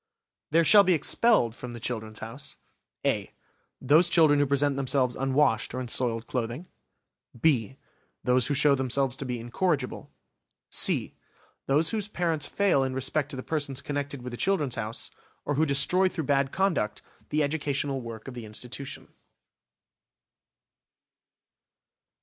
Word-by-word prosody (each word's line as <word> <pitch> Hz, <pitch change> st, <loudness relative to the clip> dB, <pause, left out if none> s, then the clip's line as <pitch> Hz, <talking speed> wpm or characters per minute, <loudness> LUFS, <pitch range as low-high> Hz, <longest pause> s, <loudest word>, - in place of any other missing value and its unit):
There 165 Hz, +2 st, +4 dB
shall 205 Hz, +5 st, +7 dB
be 185 Hz, -2 st, +3 dB
expelled 160 Hz, -, +2 dB
from 125 Hz, 0 st, -8 dB
the 120 Hz, -, -8 dB
"Children's 110 Hz, -2 st, -5 dB
House": 115 Hz, +6 st, -7 dB, 0.5 s
(a) -, -, 0 dB, 0.5 s
Those 155 Hz, +6 st, +4 dB
children 155 Hz, -4 st, +5 dB
who 145 Hz, -, +2 dB
present 140 Hz, 0 st, +1 dB
themselves 130 Hz, -2 st, 0 dB
unwashed, 135 Hz, -3 st, +1 dB
or -, -, -2 dB
in 125 Hz, -2 st, -5 dB
soiled 115 Hz, -2 st, 0 dB
clothing. 120 Hz, +6 st, -4 dB, 0.7 s
(b) 130 Hz, -4 st, +1 dB, 0.5 s
Those 125 Hz, -1 st, +2 dB
who 145 Hz, -, 0 dB
show 140 Hz, +1 st, +5 dB
themselves 130 Hz, -1 st, 0 dB
to 135 Hz, -, -6 dB
be 125 Hz, -2 st, -3 dB
incorrigible. 130 Hz, +3 st, -2 dB, 0.6 s
(c) -, -, +4 dB, 0.5 s
Those 150 Hz, +4 st, +2 dB
whose 215 Hz, -2 st, -2 dB
parents 165 Hz, -7 st, -1 dB
fail 195 Hz, -9 st, +2 dB
in 130 Hz, -1 st, -3 dB
respect 135 Hz, +2 st, -1 dB
to 145 Hz, -, -4 dB
the 130 Hz, -, -6 dB
persons 145 Hz, -4 st, -2 dB
connected 145 Hz, -2 st, -4 dB
with 125 Hz, -, -6 dB
the -, -, -5 dB
"Children's 155 Hz, -9 st, 0 dB
House", 115 Hz, -1 st, -4 dB, 0.3 s
or 145 Hz, -, -1 dB
who 155 Hz, +3 st, +2 dB
destroy 180 Hz, +7 st, +3 dB
through 165 Hz, -3 st, -4 dB
bad 140 Hz, -1 st, +1 dB
conduct 170 Hz, -, -1 dB, 0.3 s
the 150 Hz, 0 st, +1 dB
educational 145 Hz, -2 st, -1 dB
work 115 Hz, -1 st, -9 dB
of 135 Hz, -, -7 dB
the 120 Hz, -2 st, -8 dB
institution. 125 Hz, +5 st, -7 dB
135 Hz, 145 wpm, -27 LUFS, 125-155 Hz, 0.7 s, shall